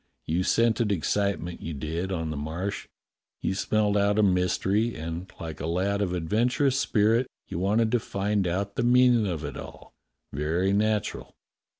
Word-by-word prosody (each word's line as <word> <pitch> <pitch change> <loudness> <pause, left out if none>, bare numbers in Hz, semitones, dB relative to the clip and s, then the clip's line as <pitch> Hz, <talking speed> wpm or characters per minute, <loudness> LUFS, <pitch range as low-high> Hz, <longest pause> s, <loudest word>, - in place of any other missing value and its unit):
You 85 +3 0
scented 115 +2 +2
excitement, 100 -1 -1
you 80 -2 -5
did, 80 +6 -3
on 80 -4 -2
the - - -4
Marsh. 85 +7 -4 0.5
You - - -1
smelt 105 +1 +1
out 100 0 +2
a 110 - +4
mystery, 95 +4 +1
and 85 +4 -6
like 80 -2 -6
a 75 - -3
lad 95 +4 0
of 95 -3 0
adventurous 125 - +1
spirit 115 +3 +2 0.2
you - - -4
wanted 110 +4 +2
to 120 - +3
find 100 -2 -1
out 100 +3 -2
the - - +1
meanin' 120 -2 +5
of 85 -4 -3
it 70 - -6
all. - - -10 0.4
Very 80 +7 0
natural. 105 +1 -1
100 Hz, 165 wpm, -27 LUFS, 85-110 Hz, 0.5 s, meanin